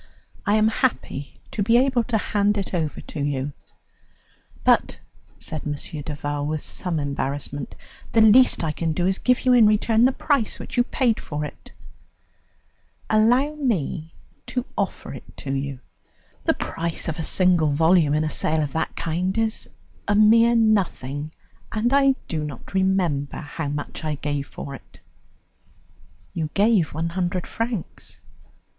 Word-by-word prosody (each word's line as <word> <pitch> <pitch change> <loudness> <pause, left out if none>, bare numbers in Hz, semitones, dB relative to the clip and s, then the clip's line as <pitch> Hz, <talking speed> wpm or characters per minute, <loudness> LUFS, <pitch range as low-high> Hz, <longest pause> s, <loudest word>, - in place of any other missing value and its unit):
I 205 - +4
am 215 0 +4
happy 220 - -2 0.2
to 210 - -3
be 230 +4 +4
able 255 -2 +3
to 235 -3 +1
hand 205 0 +1
it 195 - -3
over 160 -4 -2
to 155 - -8
you." 140 0 -2 1.1
"But," - - +3 0.4
said 155 - -5
M. 150 - -2 0.3
Duval 145 -1 -3
with 155 0 -2
some 175 -4 -2
embarrassment, 140 -1 -3 0.4
"the 225 - +4
least 220 -1 +6
I 160 - 0
can 160 +1 -2
do 175 +2 0
is 190 +1 +1
to - - -18
give 250 +1 +2
you 255 - +5
in 235 -3 +7
return 220 +2 +3
the 260 - +4
price 275 -4 0
which - - -7
you 245 - +4
paid 240 -2 +1
for 150 0 -4
it." - - -11 1.4
"Allow 245 +7 +4
me 175 - -2 0.3
to 250 -1 -2
offer 200 -2 -3
it 130 - -12
to 135 - -4
you. 135 -1 -3 0.7
The - - +3
price 165 0 -3
of 160 +1 -3
a - - -1
single 175 -3 +3
volume 160 0 +4
in 155 - +2
a 155 - -1
sale 155 0 +1
of 145 - -4
that 160 - -2
kind 180 +5 -2
is 225 0 -1 0.4
a 205 - +2
mere 230 +3 +6
nothing, 165 - +1 0.4
and 230 +4 0
I 275 -1 +5
do 155 -2 -2
not 145 +1 -8
remember 185 -7 +1
how 150 +1 -5
much 145 +2 -5
I 155 -1 -1
gave 145 -1 -3
for 140 - -8
it." 135 - -13 1.3
"You 160 -2 -2
gave 200 -5 +3
one 165 +1 -1
hundred 180 0 -2
francs." 230 -5 -5
175 Hz, 160 wpm, -23 LUFS, 150-220 Hz, 1.4 s, in